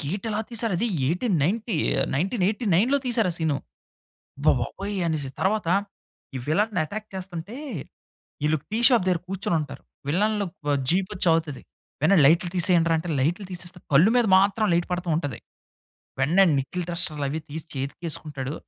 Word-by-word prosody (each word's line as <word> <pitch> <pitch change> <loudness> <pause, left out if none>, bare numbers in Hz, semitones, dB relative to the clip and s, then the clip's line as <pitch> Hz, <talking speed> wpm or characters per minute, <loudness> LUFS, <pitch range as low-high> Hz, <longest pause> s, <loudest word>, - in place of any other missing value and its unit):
Gate 190 +10 -3
ఎలా 210 +1 -1
తీశారు 230 -4 -1
అది, 235 - +1 0.2
1890 185 - 0 0.4
1989లో 205 - +2
తీశారు 225 -6 +2
ఆ 170 - -3
సీను. 160 -3 +1 0.8
అబ్బా 145 - +4
బాబోయ్! 200 - -4
అనేసి 145 -4 -2
తరువాత 190 -2 +1 0.7
ఈ - - -2
విల్లెన్ని 205 +8 +1
అటాక్ 215 +7 -7
చేస్తంటే, 185 +3 -6 0.9
వీళ్ళు 150 +1 +2
టీ 220 - -1
షాప్ 240 -8 +3
దగ్గర 180 -3 +2
కూర్చొని 190 -3 -1
ఉంటారు. 140 -2 -7 0.3
విల్లెన్లు 205 +5 +1 0.4
జీప్ 185 +4 +2
వచ్చి 180 - -2
ఆగుతది. 155 -5 -1 0.4
వెన్న 175 +6 +5
"లైట్లు 170 +4 +4
తీసేయండి 175 -1 +3
రా!" - - +4
అంటే 170 +2 -5
లైట్లు 175 +9 0
తీసేస్తే 180 +1 -4
కళ్ళు 160 +10 +6
మీద 240 -2 +4
మాత్రం 200 +3 +2
లైట్ 170 0 +1
పడుతూ 180 0 -3
ఉంటది. 145 -5 -3 0.8
వెంటనే 170 +9 +5
నికెల్ 175 +7 -3
ట్రస్టర్ 170 -3 -1
అవి 155 +3 -3
తీసి 160 +2 -5
చేతికి 135 +3 -4
వేసుకుంటాడు. 145 -3 -3
180 Hz, 150 wpm, -25 LUFS, 155-205 Hz, 0.9 s, కళ్ళు